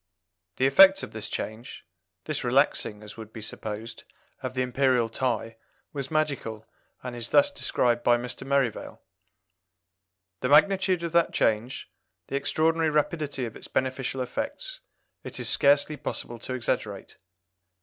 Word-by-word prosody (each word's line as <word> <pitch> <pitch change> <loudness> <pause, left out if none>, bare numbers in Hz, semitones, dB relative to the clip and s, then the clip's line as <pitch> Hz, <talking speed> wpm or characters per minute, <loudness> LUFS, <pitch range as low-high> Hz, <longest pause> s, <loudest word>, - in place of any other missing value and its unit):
The 130 - +1
effect 190 +8 +7
of - - -6
this 110 -1 -5
change, 110 +3 -6 0.4
this 155 -2 -2
relaxing, 120 -4 +1
as 105 - -11
would 110 -1 -9
be 110 - -9
supposed, 110 +1 -6 0.4
of 130 -1 -5
the 130 - +1
Imperial 125 -2 +2
tie, 115 -2 -2 0.4
was 140 -2 -4
magical, 140 -8 -2 0.4
and 125 -1 -5
is 120 -1 -4
thus 285 0 +5
described 120 - 0
by 120 0 +5
Mr. 120 +1 -5
Merivale: 135 -5 0 1.4
"The 125 - -1
magnitude 185 +3 +4
of 170 - -2
that 170 0 +3
change 115 +4 0 0.4
the - - -3
extraordinary 160 +3 +1
rapidity 150 -3 -1
of 115 - -7
its - - -8
beneficial 130 0 -2
effects 290 - -5 0.4
it - - -6
is - - -2
scarcely 145 +2 +3
possible 120 -3 -5
to 130 +3 -4
exaggerate. 105 -4 -3
130 Hz, 140 wpm, -27 LUFS, 115-155 Hz, 1.4 s, effect